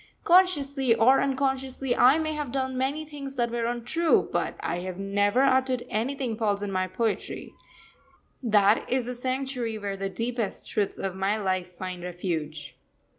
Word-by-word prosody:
Consciously 285 -9 +4
or 240 +4 +5
unconsciously, 265 -1 -1
I 260 +5 +6
may 310 -1 -1
have 295 -4 -4
done 260 0 -1
many 275 +4 -1
things 280 -2 -7
that 240 -2 0
were 235 -1 -1
untrue, 245 +8 +1
but - - -1
I 175 - -2
have 180 0 -5
never 205 +5 +2
uttered 260 -2 +2
anything 245 +2 -1
false 205 -3 0
in 200 - -3
my 185 -1 0
poetry 220 +4 -3 0.9
that 210 -3 +3
is 255 -1 +1
the 250 - -4
sanctuary 255 -2 -2
where 200 -2 -4
the 195 0 -3
deepest 230 0 -3
truths 205 -2 -1
of 195 -1 -3
my 195 +3 0
life 185 -3 -2
find 185 -1 -6
refuge. 170 -4 -4
240 Hz, 160 wpm, -27 LUFS, 200-270 Hz, 0.9 s, I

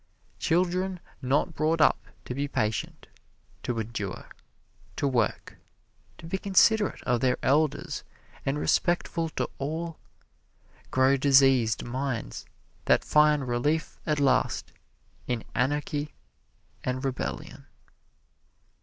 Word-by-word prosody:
Children 180 +2 +1 0.2
not 140 +6 +1
brought 155 +2 +1
up 150 - +3 0.2
to - - -4
be 140 +3 -2
patient, 110 -5 -2 0.6
to 120 - -3
endure, 105 -3 -5 0.7
to 140 - 0
work, 120 -5 -1 0.6
to - - -11
be 190 +4 -2
considerate 205 +2 +3
of 125 -1 +1
their 125 -1 +2
elders 145 +3 +1 0.4
and 135 +2 -1
respectful 170 +1 +1
to - - -2
all, 160 +4 -4 0.9
grow 130 +1 +4
diseased 135 -4 +4
minds 125 - -4 0.4
that - - +3
find 150 -2 +4
relief 145 +7 -1
at 150 -2 +1
last 130 -3 +1 0.5
in 120 -3 -2
anarchy 145 +3 -1 0.7
and 130 +2 -2
rebellion. 130 -2 -4
140 Hz, 105 wpm, -27 LUFS, 125-160 Hz, 0.9 s, grow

